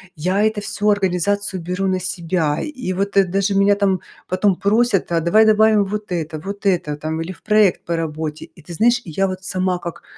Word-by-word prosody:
Я 185 Hz, +7 st, 0 dB
это 215 Hz, -1 st, 0 dB
всё 210 Hz, +1 st, -1 dB
организацию 200 Hz, 0 st, 0 dB
беру 180 Hz, +3 st, -3 dB
на 185 Hz, 0 st, 0 dB
себя, 170 Hz, -4 st, -1 dB
и 260 Hz, -11 st, -5 dB
вот, 200 Hz, +1 st, -2 dB
э, 195 Hz, -, +6 dB
даже 195 Hz, +2 st, 0 dB
меня 200 Hz, +1 st, +4 dB
там 195 Hz, -2 st, +1 dB, 0.3 s
потом 185 Hz, +1 st, +1 dB
просят: 205 Hz, -1 st, +1 dB
"А 170 Hz, -, +2 dB
давай 215 Hz, +7 st, +4 dB
добавим 215 Hz, -1 st, +4 dB
вот 210 Hz, 0 st, -5 dB
это 160 Hz, -2 st, -3 dB
вот 200 Hz, +5 st, -7 dB
это 170 Hz, -6 st, 0 dB
там". 155 Hz, +2 st, -3 dB
Или 170 Hz, +3 st, -5 dB
в -, -, -22 dB
проект 210 Hz, -3 st, +3 dB
по 170 Hz, -, -1 dB
работе. 155 Hz, -1 st, -4 dB
И -, -, -20 dB
ты 170 Hz, +2 st, -9 dB
знаешь, 235 Hz, +6 st, +3 dB
и 170 Hz, -, -8 dB
я 195 Hz, +5 st, +1 dB
вот 185 Hz, 0 st, -6 dB
сама 185 Hz, -1 st, -1 dB
как 170 Hz, -1 st, -7 dB
190 Hz, 210 wpm, -20 LUFS, 170-205 Hz, 0.3 s, э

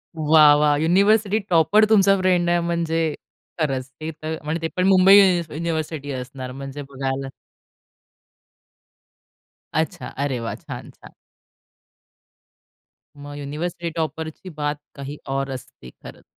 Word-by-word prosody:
वाह, 155 Hz, -1 st, +6 dB
वाह! 150 Hz, 0 st, +3 dB
University 200 Hz, +5 st, +3 dB
topper 175 Hz, +6 st, +4 dB
तुमचा 195 Hz, -2 st, +5 dB
फ्रेंड 180 Hz, -2 st, +2 dB
आहे 175 Hz, 0 st, +3 dB
म्हणजे, 165 Hz, -2 st, -1 dB, 0.5 s
खरंच. 135 Hz, -4 st, -1 dB
ते 160 Hz, +1 st, -4 dB
तर 155 Hz, +1 st, -6 dB
म्हणजे 155 Hz, +2 st, -3 dB
ते 165 Hz, -, -1 dB
पण 180 Hz, +1 st, +2 dB
मुंबई 190 Hz, +1 st, +7 dB, 0.3 s
युनिव्हर्सिटी 155 Hz, -2 st, -4 dB
असणार 130 Hz, 0 st, -6 dB
म्हणजे 135 Hz, +2 st, -7 dB
बघायला 135 Hz, 0 st, -3 dB, 2.5 s
अच्छा. 160 Hz, -1 st, -2 dB
अरे 135 Hz, -2 st, -1 dB
वाह! 115 Hz, -1 st, -4 dB
छान-छान. -, -, -11 dB, 2.0 s
मग 145 Hz, 0 st, -10 dB
युनिव्हर्सिटी 165 Hz, +4 st, -4 dB
टॉपरची 160 Hz, +2 st, -4 dB
बात 145 Hz, 0 st, -1 dB, 0.2 s
काही 140 Hz, +1 st, -7 dB, 0.2 s
और 135 Hz, 0 st, -2 dB
असते. 125 Hz, -, -10 dB
खरंच. -, -, -14 dB
155 Hz, 115 wpm, -22 LUFS, 140-170 Hz, 2.5 s, मुंबई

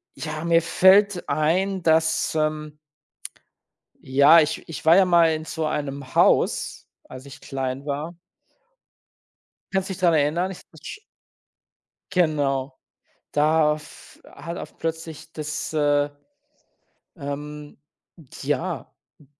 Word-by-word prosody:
ja, 155 Hz, 0 st, -5 dB
mir 170 Hz, 0 st, +4 dB
fällt 190 Hz, +2 st, +4 dB
ein, 180 Hz, +6 st, 0 dB
dass, 160 Hz, 0 st, +2 dB
ähm 155 Hz, -1 st, -2 dB, 1.2 s
ja, 140 Hz, +5 st, +6 dB
ich 155 Hz, -1 st, 0 dB
ich 165 Hz, +1 st, -8 dB
war 165 Hz, +2 st, +7 dB
ja 195 Hz, -, +6 dB
mal 170 Hz, -2 st, +4 dB
in 155 Hz, 0 st, -5 dB
so 160 Hz, -1 st, -3 dB
einem 140 Hz, -3 st, -4 dB
Haus, -, -, +2 dB, 0.2 s
als 130 Hz, +1 st, -12 dB
ich 140 Hz, -, -12 dB
klein 135 Hz, +1 st, -4 dB
war. 150 Hz, +4 st, -4 dB, 1.6 s
Kannst 190 Hz, 0 st, -1 dB
dich 190 Hz, -, -5 dB
daran 170 Hz, -3 st, +3 dB
erinnern? 170 Hz, +6 st, 0 dB
Ich 185 Hz, -, -9 dB
w -, -, -18 dB, 0.2 s
sch 285 Hz, -, -9 dB, 1.1 s
Genau. 140 Hz, -6 st, 0 dB, 0.5 s
Da 150 Hz, +1 st, +3 dB
f 150 Hz, -1 st, -14 dB
hat 170 Hz, +4 st, -8 dB
oft -, -, -9 dB
plötzlich 160 Hz, -1 st, -5 dB
das, 155 Hz, +1 st, -5 dB
äh, 145 Hz, -1 st, +2 dB, 1.1 s
ähm 150 Hz, 0 st, -7 dB, 0.7 s
ja, 145 Hz, 0 st, -3 dB, 0.2 s
d 145 Hz, -, -21 dB
155 Hz, 120 wpm, -23 LUFS, 145-170 Hz, 1.6 s, war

